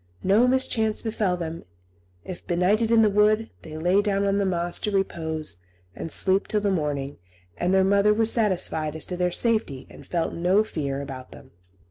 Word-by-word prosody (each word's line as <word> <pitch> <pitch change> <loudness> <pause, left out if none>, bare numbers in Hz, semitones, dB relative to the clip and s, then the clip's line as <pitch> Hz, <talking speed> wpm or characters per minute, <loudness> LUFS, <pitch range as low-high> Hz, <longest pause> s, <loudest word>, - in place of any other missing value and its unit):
No 210 +6 +4
mischance 230 -4 0
befell 215 -5 -1
them; 165 -1 -5 0.6
if 185 - -9
benighted 195 +6 +1
in 230 -1 +5
the - - +5
wood, 215 +2 +2
they 155 -1 -9
lay 180 +5 +2
down 200 -1 0
on 200 0 +1
the 200 - +1
moss 175 -1 -1
to - - -2
repose 160 - -2 0.4
and 165 - -6
sleep 190 +1 +1
till 210 - 0
the 205 -1 +1
morning; 145 - -2 0.4
and 175 - -1
their 190 0 +4
mother 200 +2 +3
was 220 +1 +2
satisfied 175 -8 0
as 160 - -4
to 180 - -5
their 180 0 0
safety, 215 - 0
and - - -14
felt 170 -2 -2
no 180 +5 +2
fear 140 -8 -4
about 130 -2 -9
them. 135 -2 -14
190 Hz, 185 wpm, -24 LUFS, 160-210 Hz, 0.6 s, in